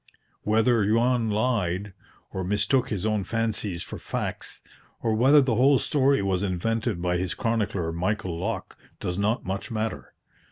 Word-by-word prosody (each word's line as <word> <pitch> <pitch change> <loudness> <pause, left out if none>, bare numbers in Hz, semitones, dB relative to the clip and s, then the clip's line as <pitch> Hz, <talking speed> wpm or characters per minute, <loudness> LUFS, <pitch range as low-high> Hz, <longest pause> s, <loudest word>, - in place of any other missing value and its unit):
Whether 110 +1 +3
Juan 120 0 +2
lied, 105 -4 0 0.4
or 95 - -3
mistook 105 +7 +1
his 100 -2 -2
own 110 -2 +1
fancies 110 -5 -1
for - - -8
facts, - - -5 0.4
or 115 -2 +2
whether 135 +6 +6
the 130 -3 +1
whole 135 +5 +5
story 135 -2 +2
was 95 -2 0
invented 100 +1 -1
by 90 0 +1
his 90 -1 -2
chronicler 105 -7 -1
Michael 95 +2 -2
Lok, - - -4 0.2
does 90 +2 -3
not 105 +4 0
much 95 +2 -4
matter. 110 - -4
110 Hz, 150 wpm, -26 LUFS, 95-115 Hz, 0.4 s, whether